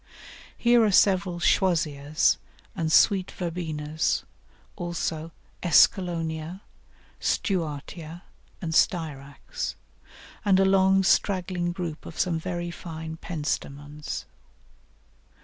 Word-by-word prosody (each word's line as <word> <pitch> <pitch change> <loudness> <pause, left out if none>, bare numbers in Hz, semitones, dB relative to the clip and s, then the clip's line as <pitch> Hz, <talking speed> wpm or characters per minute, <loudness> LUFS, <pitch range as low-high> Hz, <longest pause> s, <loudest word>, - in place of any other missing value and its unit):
Here 240 -1 +5
are 215 - +4
several 185 -2 +3
Choisyas 155 -5 +2 0.4
and 160 -1 -1
Sweet 190 +2 +4
Verbenas, 160 -3 -2 0.5
also 170 -3 -3 0.3
Escallonia, 170 0 +2 0.6
Stuartia, 165 -1 -2 0.4
and 160 -1 -2
Styrax, 145 -6 -1 0.7
and 195 -2 +4
a 195 - +5
long 190 0 +4
straggling 180 -2 +1
group 170 -3 -5
of 165 - -10
some 170 -3 +1
very 175 0 -4
fine 160 -2 -7
Pentstemons. 150 -2 -4
170 Hz, 85 wpm, -26 LUFS, 155-185 Hz, 0.7 s, Here